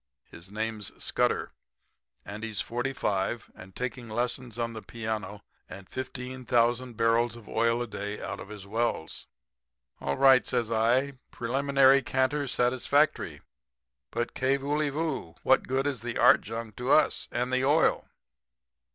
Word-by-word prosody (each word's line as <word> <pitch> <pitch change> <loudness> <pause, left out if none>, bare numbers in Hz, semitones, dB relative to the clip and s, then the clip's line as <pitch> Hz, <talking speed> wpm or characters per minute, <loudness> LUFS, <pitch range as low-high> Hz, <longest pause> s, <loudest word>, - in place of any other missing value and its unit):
His 85 +3 -12
name's 110 -1 -4
Scudder, - - +1 0.7
and 105 +2 -7
he's 110 -3 -2
45, 120 -4 -2
and 95 0 -13
taking 125 -1 -4
lessons 120 +1 -2
on 115 -1 -2
the 110 - -7
piano 110 -3 -5 0.3
and 95 -1 -10
15,000 125 -2 -1
barrels 115 0 +2
of 115 -3 -13
oil 115 +1 +1
a - - -4
day 105 -1 -5
out - - -5
of - - -9
his 105 -2 -8
wells.' 110 -6 -2 0.7
"'All 70 - -2
right,' 135 -2 +6
says 120 -3 0
I. 125 +4 +2
'Preliminary 135 +2 +3
canter 130 +2 0
satisfactory. 130 +5 +1 0.7
But, 120 +1 -3
kay 130 +1 +1
vooly, 145 +2 0
voo? 150 - -3
What - - +3
good 135 +1 0
is 135 -6 -1
the 120 0 -4
art 125 - +6
junk 115 0 -6
to 125 +1 -3
us? 155 - +3
And 125 +1 -1
the 130 0 +2
oil?' 150 +4 +3
120 Hz, 145 wpm, -28 LUFS, 110-130 Hz, 0.7 s, right